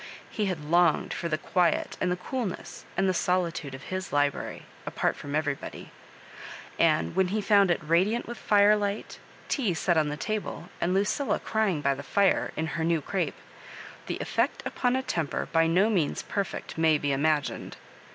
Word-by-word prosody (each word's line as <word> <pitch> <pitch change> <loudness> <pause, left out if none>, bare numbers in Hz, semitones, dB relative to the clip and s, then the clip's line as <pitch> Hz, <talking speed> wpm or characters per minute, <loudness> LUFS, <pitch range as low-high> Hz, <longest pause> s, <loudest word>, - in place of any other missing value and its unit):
He 210 -2 -1
bad 165 -6 -3
longed 170 +1 +3
for 170 - -3
the 155 - 0
quiet 175 +2 +1
and 180 - +1
the - - +1
coolness 205 +2 -5
and 195 +1 +3
the 185 - +2
solitude 170 -6 -1
of 135 - -11
his 185 0 -3
library, 145 -1 0 0.2
apart - - -1
from 145 0 -5
everybody; 150 -2 -3 0.9
and 80 +1 +2
when 190 - +3
he 210 +4 -1
found 200 -2 +4
it 175 - +2
radiant 185 +9 +2
with 240 0 -7
firelight, 205 0 +2 0.3
tea 225 - 0
set 170 +1 +1
on 155 -1 +2
the 150 - -4
table, 210 -3 -4
and 180 +2 +1
Luciila 205 +8 +1
crying 215 -8 0
by 140 -1 +2
the 135 - -6
fire, 200 +6 +2
in 160 - -1
her 160 0 -3
new 165 0 +2
crape, 180 +5 -2 0.7
the - - -2
effect - - -1
upon 250 0 0
a 260 - 0
temper 165 - -2
by 165 0 +4
no 180 +6 +4
means 185 -9 0
perfect 200 -4 -4
may 160 -1 +4
be 145 -1 -1
imagined. 145 +1 0
175 Hz, 175 wpm, -27 LUFS, 155-200 Hz, 0.9 s, found